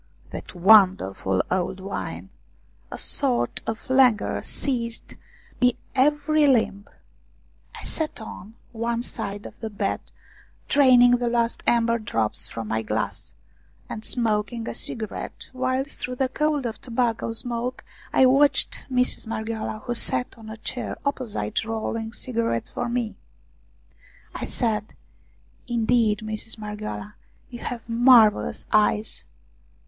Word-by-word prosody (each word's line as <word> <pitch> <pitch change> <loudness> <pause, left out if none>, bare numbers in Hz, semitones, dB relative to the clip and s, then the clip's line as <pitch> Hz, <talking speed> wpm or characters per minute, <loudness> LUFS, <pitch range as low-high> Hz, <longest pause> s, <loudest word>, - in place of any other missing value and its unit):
That - - -8
wonderful 180 - +4
old 185 +1 -1
wine! 95 - -5 0.6
A - - -6
sort 120 0 +1
of 225 0 -4
languor 255 -4 +3
seized 235 -4 -2 0.5
my 250 -1 +5 0.2
every 295 +2 +3
limb. 220 -6 +2 0.9
I - - -11
sat 315 -4 -1
on 220 -1 -9 0.2
one 235 0 -2
side 200 -3 -4
of - - -10
the 220 - -4
bed, 200 -1 -1 0.7
draining 245 -3 +6
the 245 0 -1
last 235 -1 +2
amber 235 0 +3
drops 115 - 0
from 115 -1 -6
my 110 0 0
glass, 105 -1 -3 0.5
and 215 - -6
smoking 225 -1 0
a - - -3
cigarette, 220 -4 -5
while 255 +1 0
through 255 -2 -6
the 260 0 0
cloud 300 -1 0
of 230 -1 -4
tobacco 230 -2 -1
smoke 245 +2 -1 0.3
I 260 - +5
watched 275 +3 +3
Mistress 250 -2 +1
Marghioala 220 -1 -4
who 240 - -1
sat 130 - -1
on 220 -1 -12
a 220 - -7
chair 230 +1 -4
opposite 225 - -2
rolling 225 0 -3
cigarettes 230 - -2
for 245 - -3
me. 235 -2 -2 1.2
I - - -4
said: 220 -3 -1 0.7
"Indeed, 230 -3 +2
Mistress 215 +1 -5
Marghioala, 210 -1 -6 0.4
you 240 - -7
have 235 -2 -6
mar 230 -2 +7
vellous - - -6
eyes 215 0 +2
230 Hz, 125 wpm, -24 LUFS, 210-250 Hz, 1.2 s, mar